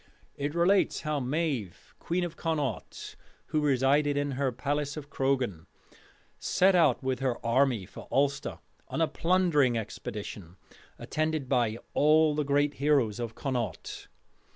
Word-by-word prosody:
It 145 +2 -3
relates 185 +3 +3
how 150 -2 -1
Maive, 135 - -3
queen 175 +2 -1
of 170 -2 -4
Connaught, 150 - -3 0.3
who 155 -1 +1
resided 145 +1 +2
in 145 0 0
her 135 0 0
palace 145 +3 -2
of 145 0 -8
Croghan, 130 -11 -1 0.7
set 190 +1 +3
out 160 -8 +3
with 130 -1 -1
her 130 -3 0
army 120 -3 +2
for - - -11
Ulster 140 0 0 0.3
on - - -4
a 165 - +3
plundering 165 -10 +2
expedition, 100 -4 -6 0.4
attended 155 -3 -2
by 120 -4 +1 0.2
all 155 +1 +4
the 150 - 0
great 145 +1 +2
heroes 135 -7 +2
of 115 -2 -4
Connaught. 125 -7 -4
140 Hz, 135 wpm, -29 LUFS, 125-155 Hz, 0.7 s, all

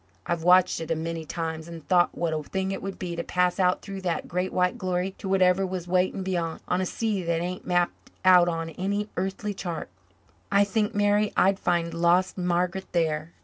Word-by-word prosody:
I've 170 -1 -1
watched 180 +1 +4
it 160 - -6
a 165 - +1
many 165 0 -4
times 160 0 -4
and 165 -2 -10
thought 175 -2 +3
what 170 -2 0
a 155 - -1
thing 190 +5 -3
it 195 - -4
would 195 0 -5
be 175 -2 -4
to 170 - -3
pass 180 +1 +1
out 180 -1 +2
through 195 -1 -6
that 175 -3 -2
great 180 +2 -2
white 180 0 +1
glory 185 0 -1
to 190 - -5
whatever 190 0 +3
was 185 -2 -4
waiting 185 +2 +1
beyant, 175 -3 -2
on 180 +1 +1
a 185 - -1
sea 215 -2 -1
that 170 -1 0
ain't 180 +2 -5
mapped 175 -1 0 0.2
out 180 -1 +7
on 165 -1 -3
any 200 +5 -2
airthly 195 +3 -2
chart. 175 -3 -5 0.6
I 200 0 +5
think, 210 +1 -1
Mary, 205 0 +2
I'd 195 +1 +4
find 170 -1 0
lost 175 +2 +2
Margaret 180 +1 -1
there." 160 -1 0
180 Hz, 205 wpm, -26 LUFS, 170-190 Hz, 0.6 s, out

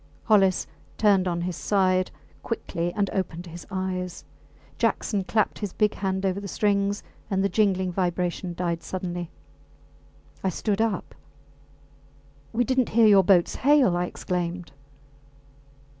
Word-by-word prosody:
Hollis 195 -4 +3 0.3
turned 200 -3 +4
on 175 -1 -1
his 180 0 -3
side 185 -1 +2 0.3
quickly 175 -6 -3
and 205 -1 +1
opened 175 -2 -3
his 170 0 -10
eyes. 185 -2 -4 0.5
Jackson 200 -3 0
clapped 215 +2 0
his 205 -4 -4
big 210 -1 +2
hand 190 0 -2
over 190 0 0
the 200 - -6
strings 200 0 0 0.3
and 195 -2 +1
the 200 - +2
jingling 190 -2 +1
vibration 180 0 -2
died 170 -1 -2
suddenly. 175 -1 -4 1.1
I 190 - +2
stood 205 +3 -1
up. 220 -5 -1 1.4
We 240 +2 +1
did 260 +2 +1
not 250 - +2
hear 230 +1 +4
your 200 -2 +7
boats 180 -2 +3
hail! 275 -9 +4
I 175 0 0
exclaimed. 175 -1 -4
190 Hz, 135 wpm, -25 LUFS, 180-205 Hz, 1.4 s, your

